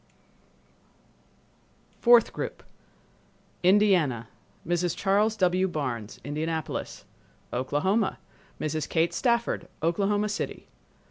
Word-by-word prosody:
Fourth 240 -1 +6
Group - - -5 1.0
Indiana—Mrs. 175 - +1
Charles 210 +3 +2
W. 185 0 +2
Barnes, 130 - -4
Indianapolis. 155 +2 -4 0.5
Oklahoma—Mrs. 155 - -2
Kate 165 0 +1
Stafford, 235 -2 0 0.2
Oklahoma 205 +5 +1
City. 205 - -4
175 Hz, 65 wpm, -27 LUFS, 155-205 Hz, 1.0 s, Fourth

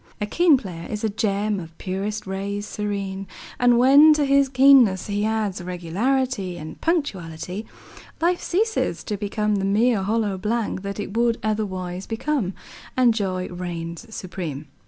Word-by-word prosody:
A 210 - -1
keen 325 +6 +4
player 175 -8 -7
is 210 0 -4
a 220 - +2
gem 210 -1 0
of 165 -2 -10
purest 200 +3 -3
rays 200 +2 -3
serene, 200 -2 -4 0.3
and 245 -1 +5
when 280 +5 +7
to 300 -1 +1
his 275 0 +3
keenness 255 -7 +5
he 205 0 -1
adds 215 -4 -1
regularity 185 +4 -1
and 155 -1 -9
punctuality, 190 - -2 0.5
life 350 +2 +1
ceases 440 +5 0
to 210 - -3
become 210 +1 -1
the 195 - -2
mere 210 +2 +2
hollow 205 -1 0
blank 215 -1 -1
that 200 +1 -5
it 205 0 -5
would 235 0 +2
otherwise 190 -4 -3
become, 230 -4 -1 0.4
and 245 -2 +5
joy 185 -4 -2
reigns 175 +2 -6
supreme. 170 -8 -6
205 Hz, 150 wpm, -23 LUFS, 185-240 Hz, 0.5 s, when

